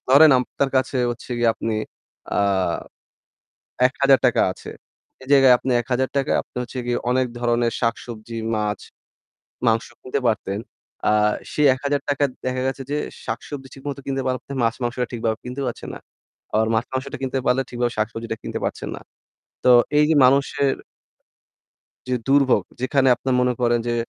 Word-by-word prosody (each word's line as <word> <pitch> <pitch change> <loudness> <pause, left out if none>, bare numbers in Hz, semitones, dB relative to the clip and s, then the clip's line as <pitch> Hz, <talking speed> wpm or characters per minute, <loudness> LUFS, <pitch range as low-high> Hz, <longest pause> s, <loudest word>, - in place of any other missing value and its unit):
ধরেন 145 +4 +8
আপনার 135 +2 -1
কাছে 130 +1 0
হচ্ছে 120 +1 -9
গিয়ে 120 -1 +3
আপনি 115 - -3 0.6
আ - - 0 1.5
৳১,০০০ 130 -1 +3
আছে। - - -10 0.5
এই 130 - -13
জায়গায় 135 -2 +7
আপনি 130 - -3
৳১,০০০ 130 +3 -1
য় - - +4
আপনি - - -38
হচ্ছে 125 +1 -7
গিয়ে 120 0 0
অনেক 130 +1 +2
ধরনের 120 -1 +1
শাকসবজি, 115 -1 -3 0.2
মাছ, 105 -1 -1 0.9
মাংস 115 0 +2
কিনতে 130 +2 -2
পারতেন। 105 -3 -1 0.5
আর 105 0 +3 0.2
সেই 150 - +2
৳১,০০০ 140 +1 -1
য় - - -19
দেখা 130 0 -1
গেছে 135 +1 -3
যে 145 - 0 0.3
শাকসবজি 135 +4 -5
ঠিকমতো 140 0 -6
কিনতে 135 -1 -1
পারছেন, 130 +2 -3
মাছ-মাংসটা 120 +1 -1
ঠিকভাবে 110 -1 -1
কিনতেও 130 +2 -4
পারছেন 120 - -5
না। - - -9 0.5
আবার 110 +1 +3
মাছ-মাংসটা 130 +4 -3
কিনতে 135 0 -1
পারলে 125 +2 +3
ঠিকভাবে 120 0 -1
শাকসবজিটা 115 +1 -2
কিনতে - - -4
পারছেন - - -4
না। - - -11 0.6
তো - - +4 0.3
এই 150 - +6
যে - - +4
মানুষের 140 +1 +3 1.3
যে 130 - -1
দুর্ভোগ, 135 -1 +4 0.2
যেখানে 135 +1 +2
আপনার 130 0 -1
মনে 125 0 +2
করেন 120 -1 +3
যে 120 - 0
125 Hz, 150 wpm, -22 LUFS, 120-135 Hz, 1.5 s, ধরেন